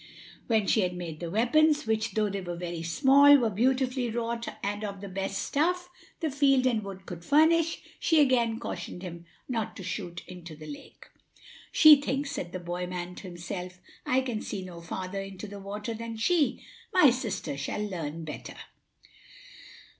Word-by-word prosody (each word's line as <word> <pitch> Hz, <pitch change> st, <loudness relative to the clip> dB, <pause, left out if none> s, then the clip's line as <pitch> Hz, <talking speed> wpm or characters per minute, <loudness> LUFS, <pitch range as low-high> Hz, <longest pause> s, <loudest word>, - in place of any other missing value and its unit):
When 220 Hz, -3 st, +2 dB
she 215 Hz, -, +3 dB
had 180 Hz, -1 st, -1 dB
made 165 Hz, -3 st, -6 dB
the 170 Hz, -, -4 dB
weapons, 295 Hz, -, +3 dB
which, 220 Hz, 0 st, 0 dB
though 215 Hz, -2 st, +2 dB
they 200 Hz, -1 st, -3 dB
were 175 Hz, -1 st, -5 dB
very 170 Hz, -1 st, -5 dB
small, 275 Hz, -, +6 dB
were 235 Hz, -5 st, +1 dB
beautifully 255 Hz, +3 st, +1 dB
wrought 230 Hz, 0 st, -3 dB, 0.2 s
and 205 Hz, +1 st, -2 dB
of 200 Hz, -2 st, -4 dB
the 200 Hz, -, -7 dB
best 195 Hz, +1 st, -3 dB
stuff 355 Hz, +4 st, 0 dB, 0.3 s
the 315 Hz, -3 st, 0 dB
field 275 Hz, -2 st, +3 dB
and 230 Hz, -4 st, +2 dB
wood 190 Hz, -1 st, -8 dB
could 170 Hz, -1 st, -8 dB
furnish, 320 Hz, -, +3 dB, 0.2 s
she 325 Hz, -2 st, +3 dB
again 240 Hz, -5 st, +3 dB
cautioned 175 Hz, -2 st, -6 dB
him 170 Hz, -2 st, -8 dB, 0.2 s
not 225 Hz, -3 st, -2 dB
to 195 Hz, -, -7 dB
shoot 175 Hz, -2 st, -5 dB
into 175 Hz, -3 st, -10 dB
the 155 Hz, +1 st, -11 dB
lake. 150 Hz, -2 st, -11 dB, 0.7 s
"She 305 Hz, -2 st, +8 dB
thinks," 280 Hz, 0 st, -2 dB
said 175 Hz, -, -4 dB
the 185 Hz, -, -4 dB
boy 175 Hz, +1 st, -4 dB
man 180 Hz, 0 st, -5 dB
to 190 Hz, -, -9 dB
himself, 180 Hz, +1 st, -6 dB, 0.2 s
"I 255 Hz, +1 st, +2 dB
can 240 Hz, -4 st, -3 dB
see 195 Hz, -2 st, -5 dB
no 175 Hz, -2 st, -9 dB
farther 185 Hz, +3 st, -4 dB
into 195 Hz, +1 st, -8 dB
the 205 Hz, -1 st, -8 dB
water 205 Hz, +3 st, -5 dB
than 230 Hz, 0 st, -6 dB
she. 305 Hz, +5 st, +1 dB, 0.3 s
My 300 Hz, -8 st, +7 dB
sister 235 Hz, -, -3 dB
shall 140 Hz, +9 st, -3 dB
learn 165 Hz, -4 st, -5 dB
better." 150 Hz, -, -7 dB
210 Hz, 175 wpm, -28 LUFS, 180-260 Hz, 0.7 s, She